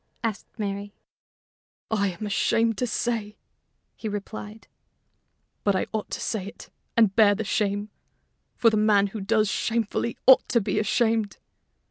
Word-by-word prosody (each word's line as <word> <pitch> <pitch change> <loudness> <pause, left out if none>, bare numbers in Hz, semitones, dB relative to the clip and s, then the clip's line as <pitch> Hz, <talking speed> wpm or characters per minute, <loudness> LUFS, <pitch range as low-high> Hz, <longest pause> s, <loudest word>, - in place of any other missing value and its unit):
asked 220 -3 -3
Mary. 200 -1 -4 1.0
"I 205 -2 +2
am 190 +3 -5
ashamed 225 +2 +1
to 250 - 0
say," 225 -3 -2 0.6
he 220 - -5
replied, 210 +1 -7 1.0
"but 200 -1 +2
I - - 0
ought 215 -1 -3
to - - -4
say 200 -4 -3
it - - -11 0.3
and 215 -4 +4
bear 210 -2 +6
the 220 - -3
shame, 205 0 -1 0.6
for 230 - +4
the 215 - +1
man 210 -1 +4
who 205 +1 -5
does 215 +2 +2
shamefully 230 +2 -1
ought 260 - +7
to 235 - +3
be 200 - -1
ashamed. 220 -1 +1
215 Hz, 145 wpm, -25 LUFS, 200-225 Hz, 1.0 s, ought